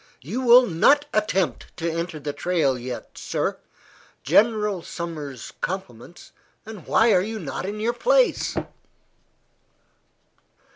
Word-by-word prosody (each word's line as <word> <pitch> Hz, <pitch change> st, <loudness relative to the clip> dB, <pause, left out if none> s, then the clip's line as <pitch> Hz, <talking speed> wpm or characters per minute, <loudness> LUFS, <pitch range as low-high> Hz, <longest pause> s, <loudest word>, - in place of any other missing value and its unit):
"You 210 Hz, -, -3 dB
will 250 Hz, 0 st, +7 dB
not 280 Hz, -, +3 dB
attempt 190 Hz, -, -1 dB
to 170 Hz, -, -2 dB
enter 165 Hz, -1 st, -3 dB
the 145 Hz, 0 st, -4 dB
trail 160 Hz, -7 st, +1 dB
yet, 125 Hz, 0 st, -7 dB
sir." -, -, -2 dB, 0.6 s
"General 210 Hz, -4 st, +2 dB
Sumner's 155 Hz, -8 st, -7 dB
compliments, 175 Hz, -5 st, -6 dB, 0.3 s
and 215 Hz, -6 st, -10 dB
why 225 Hz, +1 st, +4 dB
are 180 Hz, -, +4 dB
you 220 Hz, +3 st, -4 dB
not 175 Hz, 0 st, -5 dB
in 210 Hz, +1 st, -5 dB
your 230 Hz, +3 st, 0 dB
place?" -, -, +2 dB
185 Hz, 115 wpm, -23 LUFS, 155-220 Hz, 0.6 s, will